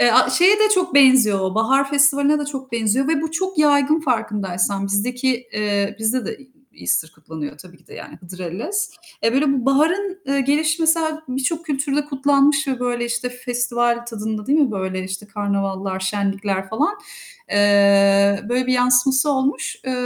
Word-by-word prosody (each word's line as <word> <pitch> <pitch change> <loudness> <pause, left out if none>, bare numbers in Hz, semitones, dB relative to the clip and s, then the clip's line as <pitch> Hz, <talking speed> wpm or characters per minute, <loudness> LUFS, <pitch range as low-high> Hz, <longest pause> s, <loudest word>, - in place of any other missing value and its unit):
Eee, 240 -1 +5 0.3
şeye 385 +4 +5
de 430 0 +4
çok 360 -3 -1
benziyor, 215 -9 +4
Bahar 270 +5 +1
Festivali'ne 285 +1 +3
de 295 - -3
çok 265 -3 -7
benziyor 235 +4 0
ve 315 -3 +1
bu 320 - -3
çok 375 +2 -3
yaygın 295 +1 +3
farkındaysan. 200 - -2
Bizdeki, 245 +4 -1
eee, 205 -1 -1
bizde 220 +1 -1
de - - -6 0.4
Easter 90 - -1
kutlanıyor 150 -1 -8
tabii 180 +2 -15
ki - - -29
de - - -14
yani - - -11
Hıdırellez. 185 - -5 0.3
Eee, 230 - +2
böyle 275 +3 +2 0.2
baharın, 360 +8 +1
eee, 275 0 0
gelişi 305 +4 0
mesela 315 -1 +1
birçok 270 +6 -2
kültürde 285 0 -1
kutlanmış 280 +1 +1
ve, 260 -2 -2
böyle, 240 -1 -2
işte, 240 +1 -3
festival 240 -1 -2
tadında 220 -2 -5
değil 290 +3 +2
mi, 280 -4 +2
böyle, 190 -1 -4
işte, 190 +2 -7
karnavallar, 195 -2 -3
şenlikler 195 0 -2
falan, 300 - -1 0.6
eee, 200 -1 +4
böyle 250 +1 0
bir 255 - +1
yansıması 255 +3 +3
olmuş. 270 +1 -1
Eee, 260 - -3
250 Hz, 160 wpm, -20 LUFS, 200-285 Hz, 0.6 s, Eee